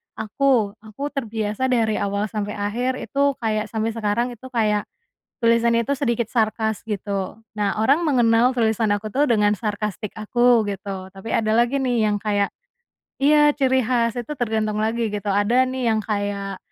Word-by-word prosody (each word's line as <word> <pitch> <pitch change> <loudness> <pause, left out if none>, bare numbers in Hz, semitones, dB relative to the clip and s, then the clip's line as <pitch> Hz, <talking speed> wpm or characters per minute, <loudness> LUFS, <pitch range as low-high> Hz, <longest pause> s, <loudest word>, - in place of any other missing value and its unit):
aku 220 0 +1
aku 220 +7 -6
terbiasa 225 -2 -2
dari 230 -4 +1
awal 200 +1 -2
sampai 210 -1 -3
akhir 235 +6 -1
itu 280 +1 0
kayak 215 -1 0
sampai 220 0 -1
sekarang 230 +2 -1
itu 240 +2 -11
kayak, 215 -4 0 0.5
tulisan 230 0 +3
itu 235 +4 +1
sedikit 235 -4 -1
sarkas 220 -2 0
gitu 200 -1 -4 0.2
nah 205 -2 0
orang 275 +9 +3
mengenal 245 -4 +3
tulisan 220 -3 +1
aku 205 +1 -2
tuh 275 +7 +1
dengan 210 -6 +2
sarkastik 210 -1 -4
aku 235 0 +2
gitu 195 -1 -5
tapi 195 +3 -8
ada 215 0 +2
lagi 240 +4 +2
nih 245 -4 +1
yang 210 -1 0
kayak 205 -1 0 0.7
iya 295 +1 +5
ciri 260 -2 +2
khas 235 -1 +1
itu 245 +5 -4
tergantung 220 -4 -1
lagi 225 +1 0
gitu 205 0 -2
ada 205 +6 +3
nih 260 -1 -2
yang 215 - -1
kayak, 200 -2 -3
220 Hz, 160 wpm, -22 LUFS, 210-245 Hz, 0.7 s, iya